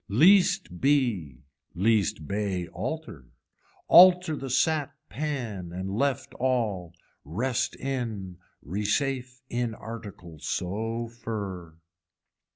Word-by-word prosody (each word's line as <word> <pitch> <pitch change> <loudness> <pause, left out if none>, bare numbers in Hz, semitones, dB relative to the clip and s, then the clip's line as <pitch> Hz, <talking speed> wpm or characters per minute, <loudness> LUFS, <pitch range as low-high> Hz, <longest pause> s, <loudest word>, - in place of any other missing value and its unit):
Least 180 - +4
bee, 110 - +1 0.3
least 100 -5 +1
bay 100 -3 -2
alter, 95 - -5 0.6
alter 180 -2 +7
the 135 -2 -6
sat 150 +2 +2 0.2
pan 115 - -4
and 95 +2 -4
left 135 +5 -1
all, 110 -9 0 0.3
rest 120 - -1
in, 110 -9 -4 0.3
resafe 125 - -1
in 120 -2 -2
article 100 -9 -9
so 115 +9 -2
fur. 100 -8 -6
115 Hz, 90 wpm, -27 LUFS, 95-135 Hz, 0.6 s, alter